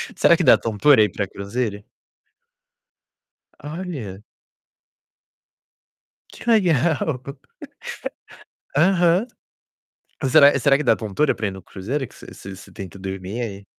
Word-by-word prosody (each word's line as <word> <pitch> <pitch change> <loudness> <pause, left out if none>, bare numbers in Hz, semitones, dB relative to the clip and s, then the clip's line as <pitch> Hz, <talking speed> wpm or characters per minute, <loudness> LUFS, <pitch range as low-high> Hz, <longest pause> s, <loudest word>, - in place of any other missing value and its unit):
Será - - +5
que - - 0
dá - - +7
tontura 115 +2 +4
ir 105 - 0
pra 100 +1 -3
cruzeiro? 100 +2 -4 1.8
Olha. 145 - -6 2.1
Que 240 - -7
legal. 160 - +2 1.5
Aham. 175 +4 +3 1.1
Será 145 0 +6
será 140 -2 +4
que 150 - -3
dá 135 - +3
tontura 110 +7 0
pra 110 - -3
ir 100 - -1
no 95 0 -10
cruzeiro, 130 +12 -4
que - - -20
você - - -13
você 95 0 -10
você - - -14
tenta 95 -3 -9
dormir, 95 +3 -5
ai 100 -4 -6
120 Hz, 115 wpm, -22 LUFS, 100-155 Hz, 2.1 s, dá